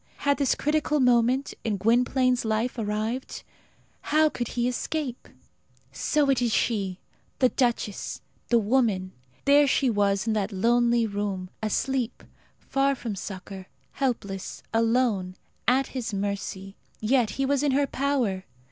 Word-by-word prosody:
Had 285 0 +1
this 275 -3 +2
critical 300 0 +1
moment 250 +1 +3
in 215 -3 -1
Gwynplaine's 250 +4 +2
life 225 +3 -1
arrived? 220 +4 -3 0.6
How 310 +1 +3
could 240 -5 -4
he 240 +1 -1
escape? 255 +1 -3 0.6
So 295 -2 +1
it 255 -2 +1
is 240 -2 +1
she 200 -6 0 0.4
the 255 - +4
duchess, 240 -6 -1 0.3
the 235 - +4
woman! 215 -5 +1 0.3
There 285 +1 +6
she 260 -1 +2
was 200 0 +1
in 225 - +1
that 210 -1 -1
lonely 235 +3 +3
room 200 -3 -3
asleep, 245 +3 -1 0.3
far 275 0 0
from 230 -5 -5
succour, 190 0 -7 0.2
helpless, 200 -8 -3
alone, 225 -5 +1 0.3
at 260 +3 +4
his 235 -5 -4
mercy; 195 -1 -4 0.2
yet 235 0 +2
he 270 - +1
was 275 0 +1
in 290 -2 +2
her 285 +1 +3
power! 255 -10 -1
235 Hz, 135 wpm, -26 LUFS, 205-265 Hz, 0.6 s, There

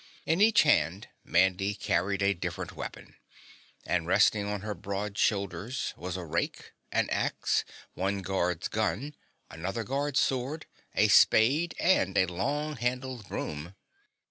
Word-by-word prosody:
In 165 +5 +1
each 215 0 +6
hand 95 - +2 0.2
Handy 95 +3 +3
carried 100 +1 0
a 100 0 +3
different 85 - -5
weapon, - - -8 0.7
and 85 -2 0
resting 100 +2 +3
on 105 -1 -3
her 105 0 -3
broad 100 0 -4
shoulders 105 +5 -1
was 90 +1 -5
a 90 - -6
rake, 80 +1 -3 0.2
an - - +1
axe, - - 0 0.3
one 95 +1 -2
guard's 90 -2 -1
gun, 110 +6 -2 0.4
another 95 +7 -4
guard's 140 +4 0
sword, 135 +4 -1 0.3
a - - +4
spade 145 +10 +5
and 100 - +2
a 95 - +5
long 140 - -2
handled 125 -1 -3
broom. 80 +5 -5
100 Hz, 135 wpm, -29 LUFS, 95-130 Hz, 0.7 s, each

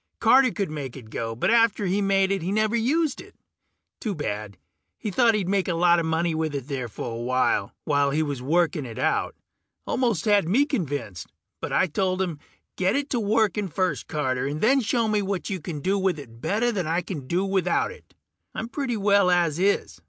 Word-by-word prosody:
Carter 260 0 +5
could 200 -6 -3
make 140 -4 -6
it 110 -4 -12
go, 115 0 -3
but 120 - +1
after 230 -3 +3
he 195 +2 +1
made 195 -1 +2
it 195 -2 0
he 175 +4 -2
never 215 +2 +1
used 280 +6 +1
it. - - -16 0.6
Too 210 -4 -3
bad; 105 -8 -4 0.4
he 210 - -4
thought 230 +1 +4
he'd 200 -4 -1
make 195 0 +1
a 175 - 0
lot 175 0 +4
of 165 - -1
money 165 +1 0
with 160 -2 -2
it 135 -2 -4
there 135 -4 -3
for 115 +2 -6
awhile, 120 -4 0
while 145 -2 +2
he 155 +3 +1
was 140 -4 -4
working 165 +3 +1
it 115 -3 -8
out. - - 0 0.5
Almost 235 -9 0
had 205 -6 +3
me 265 +9 +4
convinced, 145 - -3 0.3
but - - -4
I - - +3
told 185 +2 -1
him, 175 -6 -2 0.4
"Get 185 0 +1
it 285 0 -2
to 245 - +1
working 210 -2 +1
first, 185 +1 -1
Carter, 130 -3 -1
and 145 +2 -3
then 265 - +4
show 230 +1 +1
me 210 -1 +1
what 195 +1 -3
you 190 -3 -3
can 150 -2 -5
do 195 +5 +1
with 190 -3 +1
it 115 -5 -12
better 225 - +1
than 185 -7 -2
I 165 +2 +1
can 150 -9 -7
do 180 +6 0
without 190 -3 +1
it. - - -16 0.4
I'm - - -3
doing 230 - -7
pretty 255 -4 -2
well 200 -2 +4
as 170 -3 +2
is 200 +2 0
185 Hz, 215 wpm, -25 LUFS, 150-210 Hz, 0.6 s, Carter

